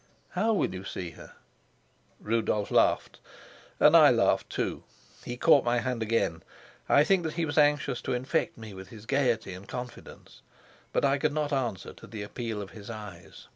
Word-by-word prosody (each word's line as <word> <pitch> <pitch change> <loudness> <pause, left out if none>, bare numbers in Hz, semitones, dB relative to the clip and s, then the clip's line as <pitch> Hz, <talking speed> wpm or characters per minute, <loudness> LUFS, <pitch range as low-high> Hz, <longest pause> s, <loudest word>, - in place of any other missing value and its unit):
"How 215 +5 +1
will 205 - +1
you 95 0 -6
see 90 -3 -5
her?" - - -13 0.9
Rudolf 105 -2 -1
laughed, - - +2 0.6
and - - +6
I - - +9
laughed - - +2
too. - - -3 0.4
He 120 - -5
caught 145 0 +5
my 120 0 +1
hand 125 -1 -2
again. 110 -7 0 0.5
I 145 - +6
think 190 +3 +3
that 160 -2 -3
he 170 -1 -1
was 145 - -4
anxious 145 -4 +2
to - - -2
infect 125 +2 -1
me 110 -3 -9
with 95 0 -10
his 110 +2 -12
gayety 120 -7 0
and 95 +2 -11
confidence. 125 -1 -9 0.5
But - - +1
I 140 +1 +2
could 150 0 +1
not 150 -1 -1
answer 120 -8 -2
to - - -14
the 105 -2 -6
appeal 110 0 -4
of 95 - -11
his 100 +4 -11
eyes. 100 -7 -10
120 Hz, 180 wpm, -28 LUFS, 105-140 Hz, 0.9 s, I